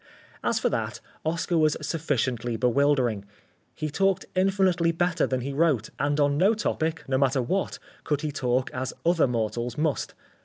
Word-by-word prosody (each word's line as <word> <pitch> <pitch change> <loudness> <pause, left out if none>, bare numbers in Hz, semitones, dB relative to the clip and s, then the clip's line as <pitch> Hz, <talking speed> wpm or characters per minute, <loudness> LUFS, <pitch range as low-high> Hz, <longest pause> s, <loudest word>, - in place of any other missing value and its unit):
As - - +1
for - - +1
that, - - -2 0.2
Oscar 165 +1 0
was 155 -1 +3
sufficiently 130 -7 -1
bewildering. 125 -3 +2 0.5
He 155 -1 -3
talked 195 +3 +1
infinitely 185 -3 +2
better 175 0 +1
than 130 -1 -1
he 140 +3 -4
wrote, 140 -7 +1
and 145 +1 +1
on 145 0 +2
no 200 +5 +4
topic, 165 -6 -1
no 130 -1 +1
matter 135 0 +2
what, 190 +11 -1 0.3
could 150 -1 -1
he 155 -2 -2
talk 130 -2 0
as 130 0 -3
other 170 -4 +4
mortals 120 0 -2
must. 155 -1 -1
145 Hz, 160 wpm, -26 LUFS, 130-165 Hz, 0.5 s, no